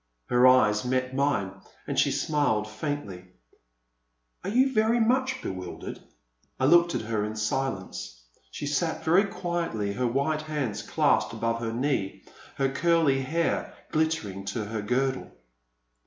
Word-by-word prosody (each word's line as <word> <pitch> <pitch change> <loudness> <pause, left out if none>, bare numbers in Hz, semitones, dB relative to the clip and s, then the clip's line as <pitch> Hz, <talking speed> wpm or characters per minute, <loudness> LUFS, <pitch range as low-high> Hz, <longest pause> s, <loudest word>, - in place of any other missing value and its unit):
Her 125 +1 +6
eyes 110 -5 +5
met 130 +1 -1
mine 135 -9 +1 0.3
and - - -1
she - - +4
smiled 145 -9 0
faintly. 105 -5 -5 1.2
Are 190 - -3
you 260 +5 +3
very 220 +1 +3
much 260 +3 +1
bewildered? 90 -2 -6 0.3
" - - -42
I 130 - +2
looked 170 +3 +5
at - - -1
her 110 -1 -1
in 105 +1 -4
silence. 100 - -3 0.3
She - - -6
sat 160 +3 -1
very 180 +6 +4
quietly, 170 - -2
her 125 +3 0
white 140 +5 0
hands 140 -9 -3
clasped - - +1
above 115 0 -1
her 115 -1 -3
knee, 120 -5 -1 0.3
her 135 -1 +1
curly 155 -1 +2
hair 165 +5 -1 0.2
glittering 155 -12 -1
to 105 +2 -3
her 110 +1 -4
girdle. 130 +5 -1
130 Hz, 140 wpm, -27 LUFS, 110-160 Hz, 1.2 s, Her